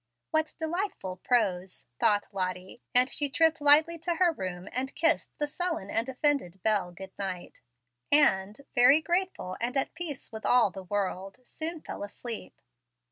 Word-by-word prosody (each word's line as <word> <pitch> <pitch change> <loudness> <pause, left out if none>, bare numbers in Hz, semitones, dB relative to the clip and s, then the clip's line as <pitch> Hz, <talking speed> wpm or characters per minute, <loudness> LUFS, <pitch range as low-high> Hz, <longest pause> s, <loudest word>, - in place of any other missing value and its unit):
"What 315 0 0
delightful 320 - -3
prose!" 190 -5 -1
thought 205 -1 +2
Lottie, 185 +3 -4
and 250 +1 +6
she 290 +1 0
tripped 320 +2 +2
lightly 310 +3 +6
to 340 +1 -2
her 350 0 +3
room 185 - -6
and 260 +2 -3
kissed 330 0 +1
the 295 - 0
sullen 310 - -3
and 230 +3 0
offended 265 - 0
Bel 205 -5 +1
good 190 +2 -10
night; 185 -3 -6 0.5
and, 210 -6 +3
very 255 +4 +6
grateful 345 - -2
and 245 +3 -1
at 270 - 0
peace 330 -5 -6
with 220 -1 -8
all 245 -5 +4
the 190 - -8
world, 195 +1 -3
soon 320 +4 -4
fell - - -8
asleep. 225 +3 -7
250 Hz, 155 wpm, -28 LUFS, 190-315 Hz, 0.5 s, and